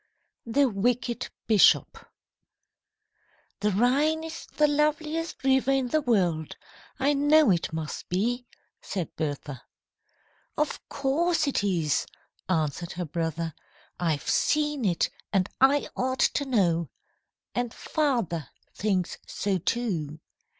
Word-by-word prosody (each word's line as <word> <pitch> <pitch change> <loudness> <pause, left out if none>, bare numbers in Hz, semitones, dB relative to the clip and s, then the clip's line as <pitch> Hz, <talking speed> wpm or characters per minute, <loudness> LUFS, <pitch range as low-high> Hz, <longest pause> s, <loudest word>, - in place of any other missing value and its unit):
THE 275 +4 +3
WICKED 240 +3 -1 0.2
BISHOP 215 -4 +4 1.5
"THE 210 - +1
Rhine 275 +10 +2
is 325 0 -7
the 300 - +2
loveliest 305 +2 -1
river 265 0 +3
in 270 -2 +2
the 310 +4 +2
world. 180 - +1 0.4
I 280 +2 +3
know 290 -2 +5
it 170 -2 0
must 160 -2 -5
be," 240 +7 -1 0.3
said 180 -5 -4
Bertha. 145 -3 -4 1.0
"Of 300 -1 0
course 310 +5 +1
it 280 -7 0
is," 170 -7 +1 0.4
answered 165 -1 -1
her 180 0 -3
brother. 165 0 -3 0.5
"I've 160 -4 -1
seen 295 -4 +1
it, 175 -4 +1 0.2
and 190 -2 +2
I 280 +2 +4
ought 260 +1 -1
to 285 - -1
know. 175 - +1 0.6
And 245 -1 -1
father 230 - -1 0.2
thinks 190 -4 -1
so, 195 -2 -1
too. 165 -8 -2
230 Hz, 115 wpm, -27 LUFS, 170-280 Hz, 1.5 s, know